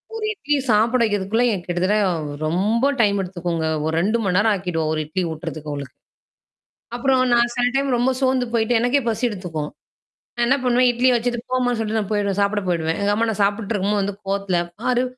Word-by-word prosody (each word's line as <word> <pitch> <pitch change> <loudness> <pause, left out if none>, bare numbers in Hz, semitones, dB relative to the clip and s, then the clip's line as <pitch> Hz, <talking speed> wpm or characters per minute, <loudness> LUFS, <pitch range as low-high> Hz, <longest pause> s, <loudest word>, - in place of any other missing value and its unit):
ஒரு 435 -1 -3
இட்லி 295 -7 -1
சாப்பிட 230 +4 +3
வைக்கிறதுக்குள்ள 210 +3 +1 0.2
கிட்டத்தட்ட 185 +4 +1 0.5
ரொம்ப 215 - +1
டைம் 200 -2 +3
எடுத்துக்குங்க. 175 -3 -3 0.2
ஒரு 160 - -1
2 215 +5 +1
மணி 180 -1 0
நேரம் 215 +1 +3
ஆக்கிடுவோ, 175 -4 -2
ஒரு 155 - -1
இட்லி 180 +4 -2
ஊட்றதுக்கு 155 -1 -6
அவங்களுக்கு. 140 -3 -7 1.0
அப்புறம் 260 +1 +2
நான் 240 0 +3
சில 245 0 +2
டைம் 275 -2 +1
ரொம்ப 250 +2 +2
சோந்து 260 -1 +1
போய்ட்டு 225 +1 +2
எனக்கே 245 +4 +2
பசி 225 +3 -2
எடுத்துக்கும். 165 -7 -5 0.7
நான் 240 0 +1
என்ன 270 - +4
பண்ணுவேன், 250 0 +4
இட்லிய 250 +1 +3
வச்சுட்டு 240 0 -1
போமான்னு 245 -2 +1
சொல்லிட்டு 220 0 -1
நான் 205 0 -5
போயிடுவேன். 200 -1 0
சாப்பிட 205 0 0
போயிடுவேன். 165 -1 0
எங்க 205 0 +2
அம்மா 230 +2 0
நான் 205 -1 -1
சாப்புட்டு 205 +2 -1
இருக்கும்போது 205 +1 0
வந்து 200 0 -2
கோவத்தல 195 -3 0 0.2
பாரு. 250 0 +2
210 Hz, 180 wpm, -21 LUFS, 185-245 Hz, 1.0 s, என்ன